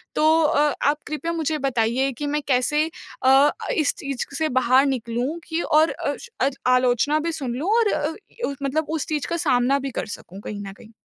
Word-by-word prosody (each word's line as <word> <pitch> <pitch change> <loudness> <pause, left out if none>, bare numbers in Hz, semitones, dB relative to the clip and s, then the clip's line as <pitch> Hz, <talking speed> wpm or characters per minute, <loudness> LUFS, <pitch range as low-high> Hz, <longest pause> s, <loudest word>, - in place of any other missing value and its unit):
तो 315 +1 +4
अ, 295 -1 +3
आप 290 +1 +3
कृपया 310 +3 -3
मुझे 315 -1 -1
बताइए 245 +2 +1
कि 295 - -3
मैं 295 +1 -1
कैसे 280 +3 +2 0.4
अ, 270 +3 +6 0.2
इस 310 -3 +1
चीज़ 275 -2 -4
से 315 -1 0
बाहर 255 +2 +4
निकलूँ 250 +3 -2
कि 325 +1 -1
और 310 0 +3
अ - - -3 0.3
अ, 270 - +4 0.2
आलोचना 255 +4 +3
भी 335 +2 -2
सुन 260 -6 -4
लूँ 320 +10 -2
और 435 -3 +2
अ - - 0
अ, 365 -1 -6
मतलब 300 +3 0
उस 315 -2 -2
चीज़ 300 -2 -2
का 340 - -1
सामना 270 -3 +2
भी 270 -1 -4
कर - - -3
सकूँ 190 +3 -13
कहीं 205 -1 -6
न 195 - -8
कहीं? 220 +3 -16
285 Hz, 200 wpm, -23 LUFS, 255-310 Hz, 0.4 s, अ